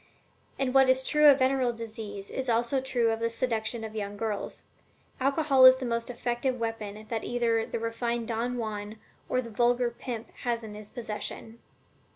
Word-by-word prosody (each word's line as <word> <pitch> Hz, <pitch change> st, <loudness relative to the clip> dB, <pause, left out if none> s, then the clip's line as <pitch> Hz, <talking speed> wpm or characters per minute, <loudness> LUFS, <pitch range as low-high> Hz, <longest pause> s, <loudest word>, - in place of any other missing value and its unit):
And 265 Hz, -2 st, -1 dB
what 265 Hz, -1 st, +6 dB
is 260 Hz, 0 st, +4 dB
true 300 Hz, +2 st, +5 dB
of 280 Hz, -2 st, +8 dB
venereal 260 Hz, -2 st, +2 dB
disease 215 Hz, -3 st, -7 dB
is 265 Hz, -1 st, -3 dB
also 235 Hz, +3 st, +1 dB
true 245 Hz, -3 st, +1 dB
of 225 Hz, -, -2 dB
the 230 Hz, 0 st, 0 dB
seduction 230 Hz, -1 st, -2 dB
of 220 Hz, -1 st, -6 dB
young 205 Hz, -1 st, -4 dB
girls. 215 Hz, -2 st, -4 dB, 0.6 s
Alcohol 275 Hz, -1 st, +5 dB
is 255 Hz, 0 st, +8 dB
the 260 Hz, -, -4 dB
most 235 Hz, 0 st, -2 dB
efficient 245 Hz, +1 st, -1 dB
weapon 220 Hz, -2 st, -4 dB
that 225 Hz, -2 st, -2 dB
either 230 Hz, -2 st, 0 dB
the -, -, -3 dB
refined 230 Hz, 0 st, -2 dB
Don 240 Hz, +2 st, -2 dB
Juan 215 Hz, -2 st, -4 dB, 0.3 s
or 255 Hz, -, +1 dB
the 230 Hz, -, -9 dB
vulgar 240 Hz, +2 st, +2 dB
pimp 235 Hz, -1 st, -6 dB
has 235 Hz, -1 st, -2 dB
in 215 Hz, -1 st, -8 dB
his 210 Hz, 0 st, -10 dB
possession." 225 Hz, -1 st, -6 dB
235 Hz, 180 wpm, -28 LUFS, 225-255 Hz, 0.6 s, of